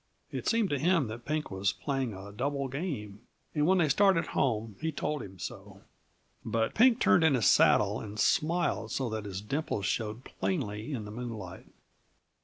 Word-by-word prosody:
It - - -4
seemed 225 -4 +2
to 145 - 0
him 165 -1 +3
that 120 +2 -8
Pink 150 -2 -2
was 95 0 0
playing 135 -4 -2
a 95 +2 -9
double 140 +5 -2
game, 130 - -5 0.3
and 150 0 +2
when 190 +1 +4
they 170 -3 +3
started 190 +1 +4
home 110 -5 0
he 160 0 -1
told 150 -1 -2
him 95 -3 -10
so. - - -8 0.6
But 115 0 0
Pink 240 0 +5
turned 175 - +4
in 160 -4 +5
his 115 -5 +1
saddle 105 +3 +5
and 105 0 -7
smiled 165 - +1
so 130 -3 -1
that 110 -1 -4
his 95 -1 -5
dimples 105 -3 -2
showed 110 +4 -2
plainly 115 - -3
in 115 -7 -4
the 105 - -8
moonlight. 110 -6 -7
125 Hz, 180 wpm, -30 LUFS, 105-155 Hz, 0.6 s, Pink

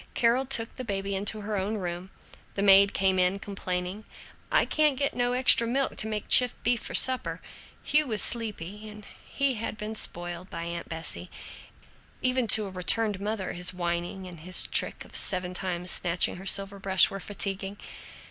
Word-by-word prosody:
Carol 245 +3 +2
took 230 -4 +2
the 255 - -5
baby 195 -3 -3
into 205 +2 -1
her 210 +1 -4
own 200 +3 -2
room. 180 -1 -5 0.5
The 200 - -1
maid 200 0 +6
came 190 -1 +1
in 180 +2 +2
complaining, 190 0 -5 0.5
"I - - +3
can't 300 -3 +2
get 280 +1 -1
no 245 0 -1
extra 250 -2 +5
milk 270 +3 -1
to 220 - 0
make 215 -1 -4
chipped 250 -2 +4
beef 240 -1 +1
for - - -5
supper." 260 -1 +2 0.4
Hugh 300 0 +3
was 215 -3 0
sleepy, 210 -3 -1
and 210 -1 -12 0.2
he 275 -1 0
had 220 -2 -5
been 215 0 -5
spoiled 175 -3 -2
by 170 - -6
Aunt 170 0 -6
Bessie. 155 - -6 0.9
Even 255 -2 +1
to 215 -1 +6
a 195 - -8
returned 200 +2 +1
mother, 205 -2 -3
his 180 +1 -1
whining 175 +2 -4
and 175 -3 -11
his 180 +3 +2
trick - - 0
of - - -11
seven 180 -1 0
times 180 -1 -2
snatching 180 0 +1
her 190 +2 -9
silver 200 0 +1
brush 190 -1 +3
were 195 - -6
fatiguing. 195 0 -3
200 Hz, 180 wpm, -27 LUFS, 180-225 Hz, 0.9 s, maid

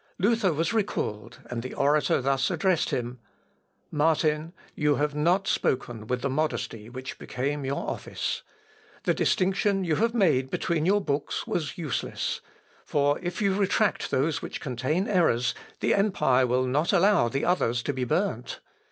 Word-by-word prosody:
Luther 210 -1 +2
was 165 +8 0
recalled, 120 - -2
and 120 -1 -4
the 130 - -7
orator 145 0 +2
thus, 135 0 +1
addressed 185 -4 +1
him: 120 0 -3 0.7
"Martin, 155 0 +1 0.2
you 150 -1 +2
have 145 +1 0
not 175 +7 +2
spoken 115 - -1
with 125 0 -2
the - - +2
modesty 130 -6 -2
which 130 +1 -7
became 140 +2 -3
your 140 +1 -2
office. - - -3 0.6
The - - +2
distinction 195 +1 +1
you 160 -4 +1
have 230 +2 +1
made 150 - +3
between 160 +2 0
your 205 +2 +4
books 145 -5 -2
was 165 +2 -3
useless, 150 - -3 0.4
for 145 0 +1
if 180 +3 -3
you 195 -1 +3
retract 205 +2 +1
those 150 +4 0
which - - -5
contain 145 - -1
errors, 145 - +2 0.3
the - - +3
empire 150 -11 +3
will 125 +1 +1
not 145 +6 +1
allow 195 - +4
the 135 +3 -1
others 125 -10 +1
to 145 - -1
be 130 -1 -2
burnt. 125 - -1
150 Hz, 155 wpm, -27 LUFS, 130-185 Hz, 0.7 s, your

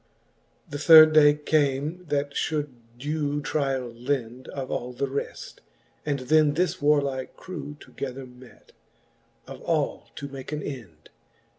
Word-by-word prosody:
VIII. - - -26
The 145 - -3
third 155 0 +9
day 145 -1 +7
came, 150 +3 0
that 145 -1 -1
fhould 150 0 -1 0.3
due 145 +2 -2
tryall 135 -5 -2
lend 125 0 -3
Of 135 -2 -6
all 125 +1 -3
the 140 - -1
reft, 135 +1 -6 0.5
and 140 -2 -1
then 150 +2 +3
this 180 0 0
warlike 140 -3 +1
crew 150 -5 -8
Together 135 -1 -7
met, 125 0 -17 0.7
of - - -10
all - - -1
to 140 - -6
make 135 0 -9
an 150 -1 -3
end. 105 - -9
145 Hz, 140 wpm, -26 LUFS, 130-150 Hz, 0.7 s, third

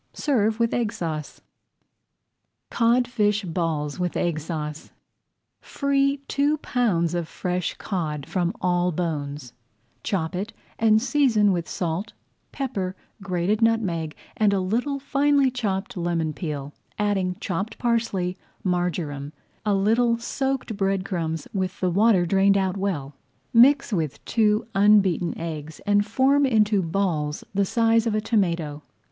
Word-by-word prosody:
Serve 225 -6 +1
with 230 -1 +1
Egg 230 -3 0
Sauce. 160 -9 -5 1.3
[Page - - -6
98] 240 +2 +4
CODFISH 210 -3 +1
BALLS 160 -3 -2
WITH 180 -1 -1
EGG 170 -3 0
SAUCE 150 -1 -5 0.7
Free 280 0 +1
two 290 +2 +1
pounds 200 - 0
of 175 -2 -2
fresh 180 0 -2
cod 155 -7 -3
from 175 +1 0
all 180 0 +1
bones; 145 -6 -4 0.5
chop 180 -3 -2
it 200 +5 -4 0.3
and 220 -1 +5
season 235 -5 +3
with 175 -3 -2
salt, 180 +5 -3 0.4
pepper, 200 -9 -3 0.3
grated 195 +3 0
nutmeg, 190 -9 +1 0.2
and 210 -2 +3
a 195 - +2
little 235 +10 -1
finely 280 -1 +2
chopped 215 -2 -2
lemon 170 -3 -1
peel, 145 -3 -5 0.2
adding 195 -3 0
chopped 195 +5 -3
parsley, 225 -7 0 0.3
marjoram, 165 -6 -2 0.3
a 210 -2 +2
little 230 +4 +3
soaked 265 0 -2
bread 195 -1 0
crumbs 165 -5 -3
with 190 -1 -2
the 185 -1 +1
water 200 -1 +4
drained 195 +2 +4 0.2
well 190 -8 -2
out; - - -19 0.4
mix 260 +1 +5
with 155 -6 -2
two 215 0 +2
unbeaten 195 -4 +3
eggs 155 -2 -6
and 205 0 +3
form 270 +6 +3
into 215 -6 +3
balls 165 -4 -1
the 200 0 +2
size 230 +2 +2
of 215 - 0
a - - +2
tomato. 170 -9 0
195 Hz, 135 wpm, -24 LUFS, 170-225 Hz, 1.3 s, and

